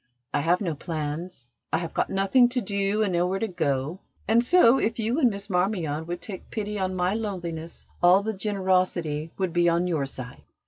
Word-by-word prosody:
I - - +2
have 170 +6 +2
no 175 -5 -1
plans, 150 -3 -5 0.2
I - - +2
have 165 -1 -5
got - - 0
nothing 195 +6 +4
to 250 +1 0
do 200 0 0
and 195 -4 -1
nowhere 180 +2 +1
to 225 - -1
go; 155 -2 -1 0.3
and 230 +3 +4
so, 270 -3 +5
if 225 - 0
you 230 +5 0
and 255 -6 +5
Miss 200 -2 -5
Marmion 180 -5 -1
would 175 0 -5
take 190 -4 -8
pity 210 -1 -3
on 185 0 -1
my 180 +1 +1
loneliness 175 -7 -5 0.2
all 180 +3 +6
the 220 +1 -2
generosity 185 -6 0
would 185 -3 -1
be 175 0 +4
on 170 +1 +1
your 160 -6 0
side. 125 -2 -8
185 Hz, 195 wpm, -26 LUFS, 165-205 Hz, 0.3 s, all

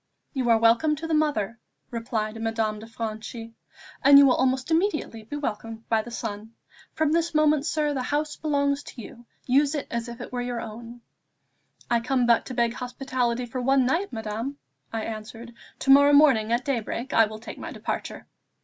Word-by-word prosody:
"You 260 -4 -1
are 230 - +6
welcome 230 +7 +3
to 315 +2 -7
the 325 - -2
mother," 240 -8 0 0.3
replied 225 -2 -3
Madame 225 -1 -1
de 220 - -10
Franchi, 225 0 -6 0.5
"and 280 0 +9
you 280 - +9
will 260 - +5
almost 260 +3 0
immediately 320 - 0
be 290 - -6
welcomed 225 -5 -5
by 225 -1 +3
the 240 - -10
son. 220 -1 -6 0.4
From 315 -1 +1
this 335 0 0
moment, 305 -1 +3
sir, 300 -2 0
the 265 - -2
house 295 +3 -1
belongs 280 -2 0
to 265 - -12
you; 235 +3 -13 0.2
use 280 +4 +3
it 290 - -3
as 235 0 -3
if 235 +1 -9
it 245 - -8
were 245 - -1
your 245 -1 -3
own." 230 +2 -9 0.9
"I 235 - +2
come 250 +1 +1
but 235 -1 +3
to 255 - -6
beg 235 -1 +1
hospitality 250 -1 -2
for 250 +2 -5
one 270 +1 +3
night, 335 +10 0
madame," 225 +4 -4 0.3
I 225 -1 -3
answered; 225 +2 -7 0.2
"to 270 - +2
morrow 285 +1 +7
morning, 265 -7 +5
at 240 +2 +1
daybreak, 250 0 -3
I 225 - +6
will 215 0 -8
take 225 - -9
my - - -6
departure." - - -5
245 Hz, 190 wpm, -25 LUFS, 225-280 Hz, 0.9 s, and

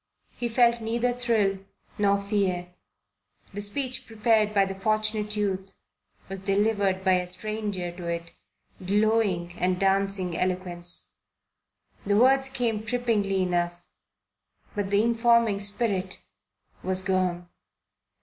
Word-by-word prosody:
He 240 - -4
felt 235 0 +3
neither 235 +2 0
thrill 225 -6 +1 0.4
nor 200 -1 +3
fear. 195 -3 -1 0.8
The 205 - -4
speech 250 +5 -2
prepared 220 -1 +2
by 200 -2 +3
the 195 - -4
Fortunate 215 +1 0
Youth 195 -2 -2 0.5
was 195 0 -5
delivered 200 -1 +1
by 185 -1 +4
a 180 - -4
stranger 205 -2 -2
to 175 0 -8
it, 170 0 -4 0.5
glowing 200 -3 +1
and 180 0 +1
dancing 195 -2 +1
eloquence. 180 -1 -2 0.9
The 200 0 +2
words 270 +3 +4
came 235 -5 -1
trippingly 215 -5 0
enough, 175 -1 -1 0.9
but 205 -2 -2
the 205 +1 +3
informing 235 -2 +3
Spirit 200 -2 -1 0.6
was 185 0 -2
gone. 180 -2 0
200 Hz, 115 wpm, -26 LUFS, 185-220 Hz, 0.9 s, by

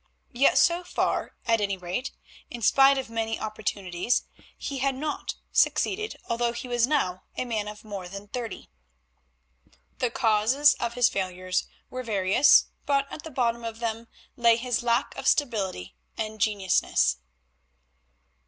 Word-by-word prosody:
Yet 260 +4 +4
so 345 +1 +4
far, - - -1
at 230 -2 +2
any 200 -1 0
rate, 185 +9 -3 0.4
in 240 -2 -7
spite 275 +3 +6
of 265 - -3
many 225 0 -2
opportunities, 205 -1 -1 0.3
he 275 -2 -4
had 270 0 +1
not 300 +3 -4 0.2
succeeded 425 +3 +1
although 235 0 0
he 235 +2 -6
was 240 -1 +2
now 185 -12 0 0.2
a - - -1
man 220 -4 -2
of 210 0 -8
more 200 -4 -7
than 200 +2 -8
thirty. 230 -1 -6 1.3
The 250 - +1
causes 230 +6 +4
of 235 -1 -2
his 245 -1 +5
failures 185 -1 -2 0.2
were 255 - -4
various, 205 +2 +4 0.2
but 275 -1 +2
at - - -6
the 320 - -8
bottom 235 -4 0
of 225 -1 -5
them 230 0 -4 0.3
lay 235 -1 +4
his 245 +1 -1
lack 235 0 0
of 270 0 -4
stability 200 - 0 0.2
and 215 -1 -4
genuineness. 190 - +2
230 Hz, 145 wpm, -26 LUFS, 205-255 Hz, 1.3 s, spite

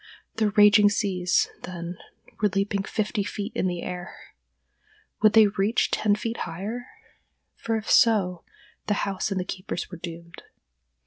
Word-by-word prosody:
The 215 -2 +2
raging 205 0 +6
seas, 185 -3 +1
then, 175 -1 -7 0.4
were 210 - +3
leaping 200 +1 -1
fifty 210 +1 -2
feet 205 +2 -5
in - - 0
the 175 -1 -3
air. 180 -1 -8 0.9
Would 215 -1 +5
they 220 -1 +8
reach 205 +2 +1
ten 205 -1 +2
feet 230 +2 -4
higher?—for 230 - -7
if 215 - -7
so, 190 -7 +4 0.4
the 210 - +1
house 195 +1 -2
and 195 -2 -1
the 180 - -3
keepers 185 -1 -5
were 175 - -8
doomed. 170 0 -9
200 Hz, 140 wpm, -25 LUFS, 180-215 Hz, 0.9 s, they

